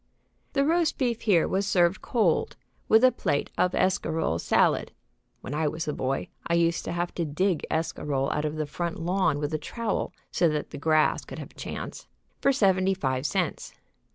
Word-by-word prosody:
The 275 0 +2
roast 330 +1 +2
beef 240 -4 0
here 190 -7 +3
was 195 +1 0
served 180 0 +2
cold, 210 -9 +1 0.3
with 220 +2 +6
a 255 - +7
plate 145 - -1
of 180 - +1
escarole 160 - 0
salad - - +2 0.5
(when 130 - -6
I 155 +1 +1
was 160 +2 -3
a 150 - -1
boy 135 0 -2 0.2
I 170 - +2
used 170 0 +2
to - - -3
have 175 0 -2
to 170 - -2
dig 165 +2 0
escarole 145 -4 -1
out 150 - -1
of 150 0 -2
the 155 -1 -2
front 170 +3 -4
lawn 175 -2 +1
with 145 +1 -3
a 155 - 0
trowel 230 +5 -3 0.2
so 170 - +3
that 150 -1 -3
the - - -7
grass 155 +1 +2
could - - -9
have - - -8
a - - -24
chance) - - -7 0.3
for 275 - +4
seventy 190 -6 +3
five 130 -5 -1
cents. 185 -4 -2
170 Hz, 190 wpm, -27 LUFS, 150-195 Hz, 0.5 s, a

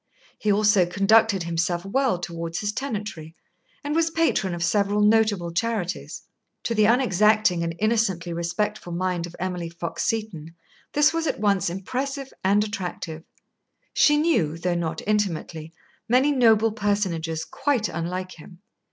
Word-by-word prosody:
He 210 - +1
also 205 -3 +4
conducted 200 +1 +3
himself 170 +1 -1
well 255 0 +1
toward 170 -1 -6
his 205 -1 -1
tenantry, 210 - -5 0.5
and 290 +1 -2
was 325 +1 +2
patron 320 - 0
of 170 - -3
several 200 +3 +1
notable 210 -5 +3
charities. 200 -2 -3 0.4
To 230 - -1
the 215 -2 +3
unexacting 215 -5 +3
and 165 0 -3
innocently 195 -5 0
respectful 175 +2 -3
mind 175 -1 -1
of 175 - -12
Emily 180 -2 -3
Fox 170 0 -5
Seton 180 -8 -3 0.4
this 295 +2 +4
was 330 -1 -1
at - - -2
once 200 -3 +1
impressive 265 +9 -4
and 200 +2 +3
attractive. 180 -6 -5 0.7
She 295 0 +4
knew, 240 - +1
though 175 +1 -1
not 165 -2 -3
intimately, 175 -6 -2 0.4
many 260 +5 +4
noble 225 -4 +4
personages 185 -7 -1
quite 270 -6 0
unlike 180 +3 -4
him. 175 +4 -14
200 Hz, 140 wpm, -24 LUFS, 170-220 Hz, 0.7 s, also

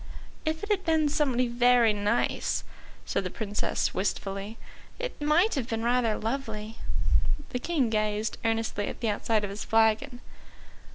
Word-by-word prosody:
"If 315 +2 -1
it 415 - -2
had 390 -2 +1
been 320 -2 +2
somebody 270 -5 +1
very 240 -1 +4
nice," 210 +3 0 0.4
said - - -1
the 185 - -3
Princess 210 +1 -1
wistfully, 195 +2 -2 0.4
"it - - -5
might 320 +9 +4
have 265 -6 -2
been 225 0 -2
rather 240 -2 +2
lovely." 225 -3 -4 0.7
The 250 - -1
King 270 -5 0
gazed 215 0 0
earnestly 225 -2 0
at - - -6
the 230 - +1
outside 215 +1 +1
of 200 - -3
his 200 - -5
flagon. 225 +2 +2
230 Hz, 150 wpm, -28 LUFS, 215-275 Hz, 0.7 s, very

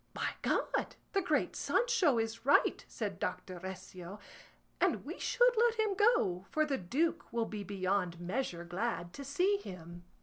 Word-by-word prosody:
"By - - 0
God - - 0 0.2
the 395 - +2
great 365 - +1
Sancho 460 - +2
is 225 0 -2
right," 280 +3 +4
said - - -4
Doctor 185 -2 -3
Recio, 185 0 -8 0.6
"and - - +1
we - - -6
should - - +3
let 460 0 +4
him 435 -2 +2
go, 375 - +2
for 310 0 +2
the 280 -3 -1
duke 280 - -1
will 235 -1 0
be 210 -2 -5
beyond 185 -3 -1
measure 175 -1 -2
glad 175 0 -3
to 280 - -7
see 360 +9 +2
him." 175 - -9
230 Hz, 160 wpm, -33 LUFS, -, 0.6 s, right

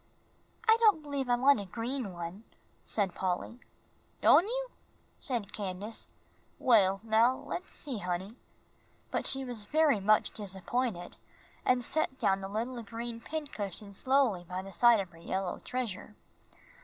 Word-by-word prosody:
"I 445 0 +7
don't 420 -9 +5
believe 280 -3 -3
I 245 - +5
want 265 0 +5
a 200 - -5
green 230 +3 -3
one," 175 +4 -7 0.4
said 200 -4 0
Polly. 185 +7 -2 0.6
"Don' 360 - +7
you?" - - -2 0.5
said 235 -7 -2
Candace. 205 +2 -5 0.5
"Well, 195 -5 +4
now 225 +3 +4
let's 350 +6 -5
see, 265 -7 -2
honey," 185 +3 -3 0.8
but - - -1
she 270 0 +1
was 235 -4 -4
very 300 -2 +3
much 210 +2 +3
disappointed, 200 0 -2 0.5
and 250 -1 +2
set 310 -3 -1
down 195 -4 +2
the 195 - -5
little 235 +4 -3
green 230 +1 -6
pincushion 215 - -5
slowly 255 -5 +2
by 180 +2 -5
the 195 0 -10
side 235 +4 +6
of 190 -3 -4
her 165 - -16
yellow 190 +2 -3
treasure. 215 -4 -4
225 Hz, 145 wpm, -31 LUFS, 195-260 Hz, 0.8 s, I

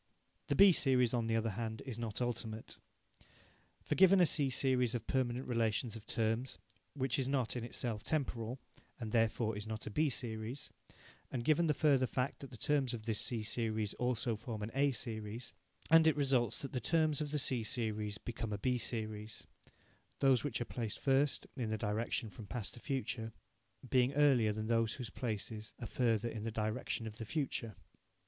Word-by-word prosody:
The - - +1
B 200 -1 +9
series, 130 -7 +4
on 115 -2 +1
the 115 - +1
other 115 0 +1
hand, 110 +1 -4
is 125 -4 -5
not 115 +1 -2
ultimate. 115 -2 -4 1.0
For, - - -1
given 190 +1 +6
a 180 - +7
C 145 -3 +2
series 125 -2 +2
of 115 -2 -3
permanent 130 -1 0
relations 115 -1 0
of 110 0 -10
terms, 115 +3 0 0.4
which 130 -2 0
is 130 - 0
not 130 -4 0
in 120 - -3
itself 115 -3 -3
temporal, 125 -5 -2 0.4
and 110 -3 -4
therefore 115 -1 +2
is 105 +1 -5
not 110 -1 -4
a - - -5
B 150 +7 +2
series, 115 +1 -4 0.6
and 120 -2 -3
given 165 +2 +4
the 150 - +2
further 135 -4 +4
fact 130 +3 -2
that 140 - -8
the 120 - -11
terms 140 -2 +1
of 110 -2 -9
this 110 -3 0
C 115 -3 -1
series 110 -2 -1
also 125 -2 0
form 110 -1 -5
an 110 - -4
A 140 +1 +3
series, 115 -1 -4 0.4
and 165 0 +8
it 160 - +5
results 135 -4 +2
that 140 - -5
the 125 - -1
terms 155 +1 +2
of 150 - -2
the 150 - -1
C 130 -4 +2
series 110 -2 -1
become 115 -1 -5
a 105 - -1
B 125 +4 0
series, 110 -2 -3 0.7
those 135 -3 +4
which 145 -5 -2
are 120 - -2
placed 115 -4 -3
first, 135 +1 +2
in 120 -5 -2
the 110 - -1
direction 110 +1 -1
from 100 +3 -10
past 115 -3 -3
to - - -10
future, 120 -4 -3 0.5
being 125 +1 +3
earlier 135 -7 +4
than 110 +1 -3
those 115 0 +2
whose 125 -3 -6
places 110 -2 -4
are 120 - -5
further 115 -2 +1
in 115 -2 -5
the 115 - -2
direction 110 +2 -2
of 110 -1 -7
the 115 - -5
future. 125 -5 -2
120 Hz, 190 wpm, -35 LUFS, 110-130 Hz, 1.0 s, B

